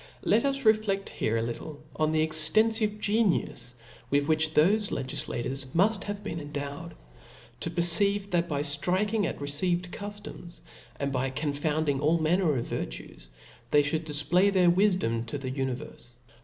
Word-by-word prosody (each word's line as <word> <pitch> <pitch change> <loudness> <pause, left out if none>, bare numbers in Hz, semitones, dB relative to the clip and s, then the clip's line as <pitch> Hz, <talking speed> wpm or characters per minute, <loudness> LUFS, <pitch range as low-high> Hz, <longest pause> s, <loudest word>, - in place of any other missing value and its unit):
• - - -19 0.2
Let 225 +6 +3
us 275 0 -1
refleft 215 -3 +2
here 110 +1 -1
a 115 - 0
little 145 +6 -6 0.2
on 155 0 +1
the 155 0 +2
extenfive 210 +7 +2
genius 205 - 0 0.3
with 145 +1 +1
which 155 0 +1
thofe 205 +7 +3
legillators 130 -1 -3
muft 195 +4 +2
have 205 0 -5
been 165 -5 -4
endowed, 145 +2 -6 0.6
to 165 - -1
perceive, 195 +4 +2
that 175 0 +1
by 145 -1 -1
ftriking 185 +8 0
at - - -4
received 175 +5 -1
cuftoms, 205 -4 -9 0.4
and 140 0 -1
by 130 0 -1
confounding 145 +1 -1
all 155 +3 +3
manner 165 0 +2
of 120 - -2
virtues, - - -6 0.4
they 145 0 +4
(hould 155 +3 -1
difplay 175 +7 +3
their 180 -3 +4
wifdom 180 - +2
tathe 130 0 -4
univerfe. 135 0 -4
160 Hz, 150 wpm, -28 LUFS, 145-200 Hz, 0.6 s, they